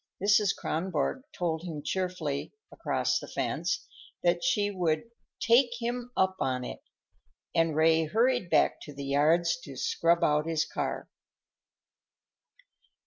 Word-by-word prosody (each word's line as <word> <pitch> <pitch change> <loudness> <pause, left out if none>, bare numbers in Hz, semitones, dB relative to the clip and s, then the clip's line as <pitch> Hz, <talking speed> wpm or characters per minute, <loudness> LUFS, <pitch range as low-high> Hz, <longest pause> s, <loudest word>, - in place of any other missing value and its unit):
Mrs. 205 0 +3
Kronborg 165 - -1
told 165 -3 -2
him 160 -4 -6
cheerfully, 180 -7 -2 0.2
across - - 0
the - - -9
fence, - - -2 0.4
that 175 0 +2
she 210 -6 +2
would 170 -5 0 0.4
"take 240 0 +3
him 240 +1 -3
up 190 0 +2
on 130 -1 -1
it," - - -7 0.7
and 165 -2 +2
Ray 160 +1 +4
hurried 230 +3 +1
back - - +3
to 145 - -10
the 140 0 -6
yards 160 - +2
to 140 - -10
scrub 170 +6 +1
out 150 +1 +2
his 165 -1 +1
car. - - -3
170 Hz, 130 wpm, -29 LUFS, 155-205 Hz, 0.7 s, Ray